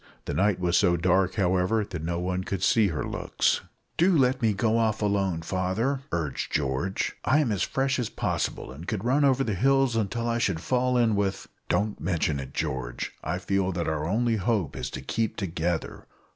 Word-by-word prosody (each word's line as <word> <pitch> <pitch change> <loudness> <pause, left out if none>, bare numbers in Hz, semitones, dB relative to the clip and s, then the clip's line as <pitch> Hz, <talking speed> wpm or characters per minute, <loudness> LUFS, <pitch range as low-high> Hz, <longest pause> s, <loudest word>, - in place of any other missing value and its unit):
The - - -3
night 100 0 +2
was 90 -1 +2
so 90 -3 +3
dark, 90 +2 +2
however, 95 +3 +1
that 90 -5 -6
no 85 +1 -2
one 90 +1 -2
could 95 -1 -3
see 110 -1 +4
her 80 -5 -2
looks. - - 0 0.4
"Do 175 0 +4
let 130 -1 +2
me 110 -2 +3
go 110 +3 +1
off 110 -2 +1
alone, 95 -5 0
father," 95 +10 -1
urged 80 -5 -2
George; 70 +7 -1
"I 130 - +3
am 145 -7 +2
as 100 - -1
fresh 135 0 0
as 120 - -1
possible, - - -2
and 75 +7 -10
could 105 0 -3
run 135 +4 +3
over 135 -1 +3
the 110 - -1
hills 135 +4 +3
until 115 +2 -1
I 115 0 0
should 95 -8 0
fall 125 +6 +1
in 115 -3 +3
with 100 -1 -1
" - - -42
"Don't 105 0 0
mention 80 -4 0
it, 65 -1 -7
George; - - -3
I 90 - -1
feel 95 +1 0
that 85 0 -2
our 80 0 -1
only 115 +4 +1
hope 100 - 0
is - - -4
to - - -6
keep 110 +11 -1
together. 85 -3 -3
100 Hz, 200 wpm, -27 LUFS, 85-115 Hz, 0.4 s, see